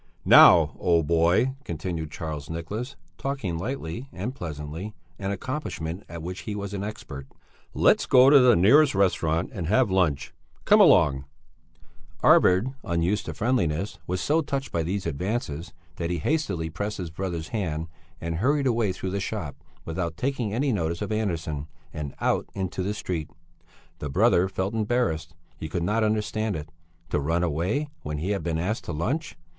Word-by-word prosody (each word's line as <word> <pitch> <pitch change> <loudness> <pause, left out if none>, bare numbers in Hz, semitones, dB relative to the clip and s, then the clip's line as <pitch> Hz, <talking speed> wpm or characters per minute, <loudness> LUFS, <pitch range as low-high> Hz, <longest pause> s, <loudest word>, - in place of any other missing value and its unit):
"Now, - - +8
old 85 -3 +2
boy," 85 - +3
continued 80 - -4
Charles 75 -1 -6
Nicholas, 105 +11 -5 0.2
talking 125 -12 -3
lightly 115 +1 -5
and 105 +8 -4
pleasantly, 80 - -6 0.2
an 100 -1 -3
accomplishment 100 - -4
at 85 -1 -7
which 90 +2 -5
he 105 - -5
was 100 -1 -5
an 100 -1 -3
expert. 70 - -7 0.5
"Let's - - +4
go 130 +2 +7
to 145 - +9
the 125 -3 +6
nearest 135 - +5
restaurant 90 - +1
and 90 -8 -4
have 110 +2 +3
lunch. 85 -7 +1 0.3
Come - - +6
along!" 70 -1 +5 1.0
Arvid, 100 +9 +5
unused 85 +5 0
to - - -5
friendliness, 100 - 0
was 90 +1 -1
so 155 +3 +2
touched 140 -2 -3
by 85 - 0
these 95 +4 -2
advances 85 -1 -3 0.3
that 85 -1 -2
he 90 - -1
hastily 85 - -1
pressed 100 +6 -3
his 85 -4 -5
brother's 85 -2 -4
hand 80 -8 -2 0.3
and 80 0 -3
hurried 140 - +2
away 115 -6 +1
through 95 0 -4
the 100 - -1
shop 95 -7 -4 0.3
without 85 0 -3
taking 125 -2 -1
any 130 +5 0
notice 85 -2 -1
of 105 - -4
Andersson, 80 -9 -2 0.3
and 75 -4 -5
out - - 0
into 95 -1 -3
the 100 +3 -2
street. 85 -6 -4 0.7
The 75 - -4
brother 95 - +3
felt 95 +2 -2
embarrassed; 105 -8 -1 0.2
he 80 - -6
could 85 0 -2
not 105 +5 +1
understand 110 -1 0
it. 75 -1 -6 0.4
To - - +1
run 80 +5 0
away 90 - 0
when 75 0 -4
he 90 +7 -2
had 100 - -1
been 85 -2 -1
asked 95 +7 -2
to 85 - -4
lunch! 125 - -2
90 Hz, 165 wpm, -26 LUFS, 80-110 Hz, 1.0 s, to